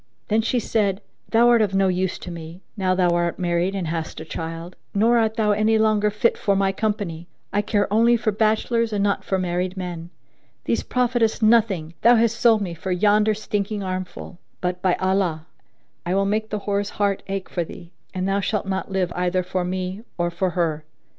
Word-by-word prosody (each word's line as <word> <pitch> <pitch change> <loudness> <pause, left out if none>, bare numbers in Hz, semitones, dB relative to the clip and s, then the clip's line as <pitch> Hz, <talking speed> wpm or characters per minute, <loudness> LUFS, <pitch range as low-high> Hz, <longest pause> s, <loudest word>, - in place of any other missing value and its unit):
Then 215 +1 +3
said 220 -4 0
she, - - -41 0.2
"Thou 235 +1 +5
art 235 -2 +5
of 200 -3 +1
no 195 0 +3
use 185 0 0
to 180 - -8
me, 170 +2 -9
now 185 -3 +1
thou 180 -1 +3
art 170 0 0
married 175 +1 0
and 190 -3 -2
hast 160 0 -4
a 160 - -7
child; 165 +2 -6 0.2
nor 230 +4 +4
art 220 -1 +1
thou 215 -2 +2
any 215 +2 +3
longer 215 -1 +3
fit 210 +3 +1
for 200 - +1
my 195 0 +2
company; 195 -5 -3 0.3
I 205 - +2
care 205 -1 +1
only 235 +2 +5
for 220 -1 0
bachelors 220 +2 +1
and 205 -1 0
not 200 -1 0
for 190 - 0
married 180 +1 -2
men:[FN#2] 175 -2 -10
these - - +1
profit 250 -1 0
us 225 0 +1
nothing 210 -8 +3
Thou 240 +1 +6
hast 230 0 +2
sold 225 -3 +5
me 175 -3 -4
for 170 +3 -5
yonder 210 +3 +3
stinking 205 -1 -3
armful; 185 -1 -5 0.2
but, 180 0 -2
by 185 -1 +2
Allah, 185 -4 0 0.6
I 180 +1 -1
will 195 0 +2
make 215 +2 -1
the 210 -1 -3
whore's 200 0 -1
heart 200 -1 +1
ache 195 -1 -3
for 175 - -2
thee, 170 +1 -11 0.2
and 185 0 -2
thou 195 +1 +1
shalt 205 +1 -1
not 190 0 -3
live 185 -2 0
either 180 +1 0
for 185 0 -2
me 185 +2 -3 0.2
or 175 -1 0
for 185 +2 0
her!" 160 -3 0
195 Hz, 205 wpm, -23 LUFS, 180-215 Hz, 0.6 s, Thou